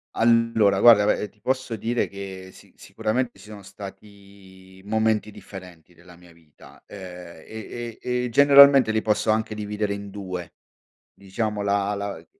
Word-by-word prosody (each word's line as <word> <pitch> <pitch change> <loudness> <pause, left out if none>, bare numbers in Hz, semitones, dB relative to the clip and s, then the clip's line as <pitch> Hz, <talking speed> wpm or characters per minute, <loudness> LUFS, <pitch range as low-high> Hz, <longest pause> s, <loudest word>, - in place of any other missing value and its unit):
Allora 115 -3 +3
guarda, 110 -2 +7
ve 105 0 0
ti 105 - -32
posso 130 0 -2
dire 115 +3 -2
che 95 -1 -9
si - - -19
sicuramente 120 +1 -3
ci 105 +2 -15
sono 105 -1 -10
stati 95 -1 -14
momenti 110 0 0
differenti 90 -5 -13
della 90 +1 -18
mia 90 0 -19
vita, 80 -3 -20
ehm, 90 -4 -11
e 115 +1 -8
e 125 0 -2
e 125 - -3
generalmente 140 -1 +7
li 110 0 0
posso 110 0 0
anche 110 0 0
dividere 105 -1 -3
in 100 0 -8
2, 95 -4 -7 0.6
diciamo, 105 +2 -4
la 100 0 0
la 100 -5 -6
105 Hz, 150 wpm, -23 LUFS, 95-110 Hz, 0.6 s, guarda